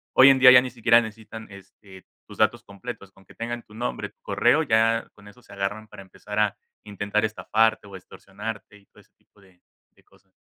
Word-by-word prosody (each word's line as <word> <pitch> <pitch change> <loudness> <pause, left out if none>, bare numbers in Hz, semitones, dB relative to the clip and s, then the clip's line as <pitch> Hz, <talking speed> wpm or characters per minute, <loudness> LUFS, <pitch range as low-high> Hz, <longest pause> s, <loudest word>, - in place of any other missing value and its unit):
hoy 130 +1 +8
en 135 - +5
día 130 -1 +9
ya 125 0 +8
ni 130 - -5
siquiera 115 0 +4
necesitan 110 0 -10
este 100 -1 -16 0.2
tus - - -13
datos 120 +2 +1
completos, 100 -1 -10
con 95 0 -22
que - - -18
tengan 120 +1 -5
tu 105 - -20
nombre, 120 +3 -5
tu - - -38
correo 125 +7 +2
ya 115 -3 +1
con 105 0 -18
eso 115 +5 -17
se - - -20
agarran 105 +2 -4
para 105 -2 -12
empezar 105 +2 -10
a 105 -2 +1 0.3
intentar 105 +1 -2
estafarte 110 0 0
o 100 - -12
extorsionarte 105 +3 -9
y 100 - -25
todo - - -21
ese - - -30
tipo 105 - -29
de 95 -2 -25 0.3
de - - -27
cosas. - - -29
110 Hz, 210 wpm, -24 LUFS, 100-115 Hz, 0.3 s, día